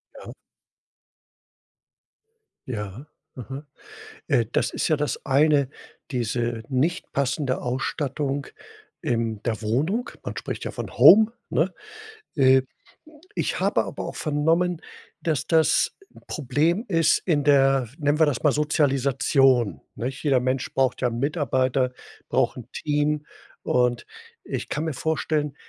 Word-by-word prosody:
Ja. - - -10 2.3
Ja, 105 +1 -5 0.3
aha 135 +4 -8 0.6
äh, 125 -7 +2
das - - +1
ist - - -1
ja 155 - +2
das 150 0 -2
eine. 140 0 +3 0.4
Diese 120 -2 -2
nicht 155 +8 -1
passende 135 0 -1
Ausstattung 140 +2 -2 0.5
in 115 -3 -1
der 115 -2 -2
Wohnung. 150 - 0
Man - - -5
spricht - - -5
ja - - -3
von - - -7
Home, 220 +2 +8 0.2
ne? 180 +4 +1 0.6
Äh, 130 -2 +5 0.7
ich - - -1
habe - - +2
aber - - -6
auch - - -6
vernommen, 165 +3 +1 0.4
dass, 155 -5 -1
das 160 -1 +3 0.4
Problem 160 - 0
ist, 165 -4 +3
in 150 -6 0
der, 135 -3 +4
nennen 145 0 +1
wir 160 - +6
das 145 -3 -2
mal, 150 - +5
Sozialisation, 135 -4 +2
nech? 130 +6 -5
Jeder 135 -4 +3
Mensch 130 +1 -2
braucht 130 -1 +1
ja 125 - +2
Mitarbeiter, 130 -1 0 0.4
braucht - - +1
'n 120 -1 -10
Team. 150 0 0 0.4
Und 125 -1 +1 0.4
ich - - -5
kann 150 +3 -2
mir 160 - -2
vorstellen, 150 0 -1
140 Hz, 125 wpm, -24 LUFS, 125-155 Hz, 2.3 s, Home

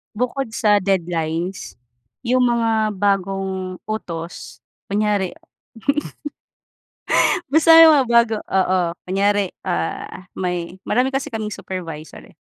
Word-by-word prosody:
Bukod 250 0 -2
sa 210 -2 +3
deadlines 175 -1 -2 0.5
yung 250 +1 +3
mga 225 -3 +1
bagong 190 -1 -1
utos 175 -6 -6 0.2
kunyari. 205 -2 0 2.2
Basta 325 +2 +7
yung 325 -1 +9
mga 275 -3 +4
bago, 235 -2 +4
oo. 185 -1 +1 0.3
Kunyari, 200 +1 +1
ah, 185 - -4
may 180 0 -4
marami 255 +4 0
kasi 270 0 -2
kaming 215 -2 -4
supervisor, 165 -6 -7
eh, - - -20
200 Hz, 100 wpm, -20 LUFS, 185-230 Hz, 2.2 s, yung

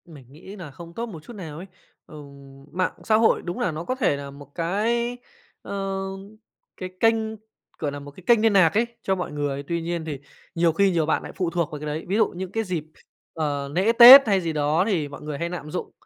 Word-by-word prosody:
Mình 150 -6 -14
nghĩ 180 +7 -12
nà 170 -8 -9
không 170 +5 -12
tốt 230 +6 -4
một 170 -10 -10
chút 240 - -11
nào 165 -8 -8
ấy. 180 +4 -9 0.4
Ừm, 140 -2 -13
mạng 185 +2 -1
xã 215 - +2
hội 225 +1 +3
đúng 175 0 -5
là 180 - 0
nó 155 +1 -5
có 255 - -2
thể 250 - +1
là 140 0 -8
một 140 0 -14
cái, 230 +8 -1 0.4
ờ, 195 -1 -4 0.8
cái 185 - -6
kênh, 225 +1 +4 0.6
gọi 145 -2 -2
là, 145 - -6
một 145 0 -11
cái 180 +6 -16
kênh 235 -2 +5
niên 225 -1 +3
nạc 180 -5 +5
ấy 225 +3 +2 0.2
cho 190 - +1
mọi 180 - -4
người. 145 -1 -3
Tuy 170 +3 -3
nhiên 170 -1 -3
thì 150 -4 -5 0.4
nhiều 165 -1 +2
khi 195 +3 +3
nhiều 165 -3 +1
bạn 160 - 0
nại - - -8
phụ 180 -3 -1
thuộc 170 -2 -2
vào 150 - -6
cái 150 - -7
đấy. 150 +2 -4
Ví 190 - -1
dụ 220 - +4
những 185 0 -6
cái 225 +2 -1
dịp, 180 -6 -3 0.5
ờ, 145 -3 -2
lễ 190 +7 +2
Tết 245 +3 +11
hay 195 -3 +2
gì 165 -2 -3
đó 150 +3 +1
thì 170 -9 0
mọi 140 -1 -11
người 150 -1 -5
hay 170 +3 -3
nạm 165 -4 -7
dụng, 180 - -5
170 Hz, 245 wpm, -24 LUFS, 150-195 Hz, 0.8 s, Tết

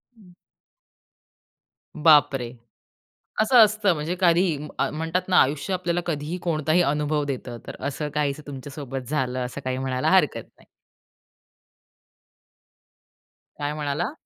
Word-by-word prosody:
हं. 185 -5 -19 1.6
बापरे! 145 -6 +4 0.9
असं 245 +3 +4
असतं 210 -3 +1
म्हणजे 160 +3 -3
कधीही 170 -2 +3 0.4
म्हणतात 165 +4 -1
ना 180 - +4
आयुष्य 150 +7 0
आपल्याला 175 -1 -1
कधीही 160 +1 -3
कोणताही 160 0 +1
अनुभव 150 -1 0
देतं, 125 -3 -5
तर - - -7
असं 150 +2 -4
काही 145 -2 0
तुमच्यासोबत 135 -2 -7
झालं 130 -4 -1
असं 135 +3 -7
काही 130 0 -1
म्हणायला 130 -1 -1
हरकत - - +3
नाही. - - -22 2.9
काय 145 +1 -2
म्हणाला? 150 - -2
150 Hz, 110 wpm, -24 LUFS, 140-175 Hz, 2.9 s, बापरे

